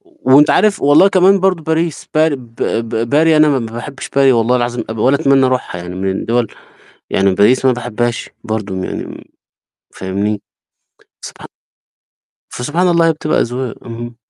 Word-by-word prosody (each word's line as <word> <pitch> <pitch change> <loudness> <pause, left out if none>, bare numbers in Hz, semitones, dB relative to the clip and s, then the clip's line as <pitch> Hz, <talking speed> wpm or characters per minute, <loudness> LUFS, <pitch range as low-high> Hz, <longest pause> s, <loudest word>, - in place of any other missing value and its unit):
وأنت 315 - +2
عارف 210 -2 +2
والله 145 +7 +5
كمان 190 0 +3
برضه 185 -4 +1
باريس 160 0 -2
بار 155 -1 +3
ب 120 -3 -12
ب 115 0 -2
باري 155 +2 +3
أنا 155 0 +5
ما 140 - +1
باحبش 120 +4 -7
باري 135 -1 +3
والله 120 +2 +2
العظيم 120 0 -2
أب 110 - -6
ولا 130 +6 +2
أتمنّى 135 -1 +3
أروحها، 125 -8 -3
يعني 90 +1 -8
من 95 +1 -2
الدوَل 115 +4 -1 0.6
يعني 95 -1 +1
باريس 105 +6 +4
أنا 130 - +4
ما - - -2
باحبهاش 120 0 -3
برضه 110 -3 -4
م 95 0 -4
يعني - - -5
م - - -11 0.7
فاهمني، 100 +2 -3 0.8
سبحا - - -10 1.0
فسبحان 160 +9 -1
الله 170 -1 +3
هي - - +3
بتبقى 155 0 -1
أذواق، 125 0 -3
اهم. 120 0 -8
125 Hz, 170 wpm, -15 LUFS, 115-155 Hz, 1.0 s, والله